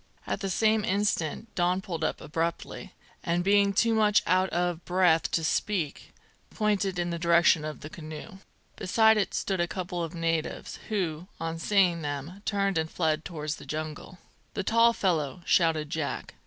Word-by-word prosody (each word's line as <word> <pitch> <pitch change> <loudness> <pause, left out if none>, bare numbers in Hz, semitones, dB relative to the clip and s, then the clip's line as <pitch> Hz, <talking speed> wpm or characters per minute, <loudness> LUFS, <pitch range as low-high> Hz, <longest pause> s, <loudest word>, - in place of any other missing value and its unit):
At - - -2
the 195 -1 -3
same 215 +3 +2
instant 205 0 -1
Don 180 0 +1
pulled 175 -5 -5
up - - -1
abruptly, 165 +2 -4 0.3
and 175 0 0
being 200 +1 +4
too 230 +4 +2
much 215 -1 +4
out 185 +1 +3
of 175 -1 -1
breath 175 -3 +3
to 165 - 0
speak, 165 -1 -1 0.4
pointed 205 -3 0
in 175 0 -1
the 170 - -3
direction 170 -1 +4
of 155 0 -6
the 150 - -7
canoe. 160 +5 -9 0.4
Beside 220 +3 +4
it 205 - 0
stood 190 -2 -1
a 175 - +1
couple 180 -1 -4
of 165 +1 -5
natives, 165 -1 -2
who, 180 -5 -2
on 165 0 -3
seeing 180 -2 +3
them, 145 +6 -5
turned 195 -4 +1
and 160 0 -2
fled 160 -2 0
towards 155 -3 -4
the - - -11
jungle. 155 +3 -5 0.4
"The 200 - -1
tall 230 +3 +5
fellow!" 165 - -1
shouted 160 -3 +2
Jack. 155 -3 -3
175 Hz, 170 wpm, -28 LUFS, 160-200 Hz, 0.4 s, tall